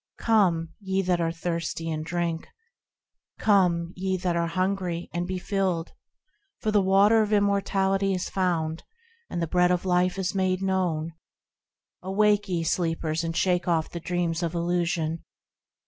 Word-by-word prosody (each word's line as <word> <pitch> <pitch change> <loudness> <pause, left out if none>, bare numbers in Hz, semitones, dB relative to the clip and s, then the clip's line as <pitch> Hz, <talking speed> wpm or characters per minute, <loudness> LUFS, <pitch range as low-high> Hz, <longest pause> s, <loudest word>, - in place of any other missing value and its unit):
Come, 180 -8 +2
ye 190 -1 -1
that 180 -1 +1
are 165 0 +1
thirsty, 165 -1 -3
and 155 0 -3
drink; 170 0 -2 0.9
Come, 180 -5 +2
ye 190 0 -1
that 180 -1 -1
hunger, 175 +1 -1
and 175 +1 -2
be 185 0 -2
filled; 185 -3 -1 0.7
For 215 - -1
the 210 -1 +4
Water 200 +4 +5
of 210 0 -1
Immortality 195 -1 +2
is 180 - -3
found, 165 -4 -1 0.5
And 170 - -2
the - - -1
Bread 180 +2 +3
of 180 +1 0
Life 180 +1 +2
is 185 -2 -1
made 185 -1 0
known. 175 -4 0 0.9
Awake, 205 +2 +2
ye 170 -2 0
sleepers, 165 -1 -1
and 165 0 -3
shake 180 -1 +1
off 165 -2 +1
the 170 - -5
dreams 170 -1 -1
of 170 0 -2
illusion 170 -1 -1
180 Hz, 145 wpm, -26 LUFS, 170-190 Hz, 0.9 s, Water